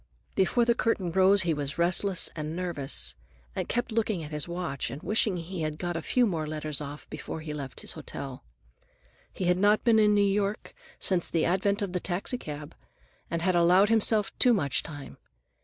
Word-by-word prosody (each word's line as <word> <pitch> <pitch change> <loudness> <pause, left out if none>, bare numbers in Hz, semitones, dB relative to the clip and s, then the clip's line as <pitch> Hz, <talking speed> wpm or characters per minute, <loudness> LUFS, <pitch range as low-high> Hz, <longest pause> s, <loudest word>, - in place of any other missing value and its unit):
Before 215 +6 +2
the 235 - +4
curtain 210 -7 0
rose 190 +2 +4
he 170 -2 +1
was 145 -1 -4
restless 180 +2 +3
and 155 0 -4
nervous, 170 - -2 0.4
and - - -3
kept 240 0 -1
looking 215 -6 0
at 150 - -8
his 150 +1 +2
watch 170 -6 -3
and 140 - -8
wishing 210 -2 +1
he 175 +1 -6
had 155 -1 -2
got 175 0 -3
a 165 - -2
few 250 +8 +2
more 165 -7 -2
letters 155 -1 0
off 145 +1 -8
before 155 +1 -6
he 155 -1 -6
left 140 -3 -6
his - - -1
hotel. 135 -2 -7 0.9
He 185 - -4
had 180 +1 +2
not 205 +2 +3
been 225 -2 +4
in 210 -1 +4
New 205 0 +4
York 200 +1 -1 0.2
since 180 -3 +1
the 165 - +1
advent 200 +4 +1
of 190 -3 -4
the 180 - 0
taxicab, 175 - -4 0.6
and 170 0 -2
had 185 -1 +2
allowed 180 +4 +5
himself 220 -2 +3
too 245 -2 +5
much 140 - 0
time. 145 -4 -10
175 Hz, 190 wpm, -28 LUFS, 155-205 Hz, 0.9 s, allowed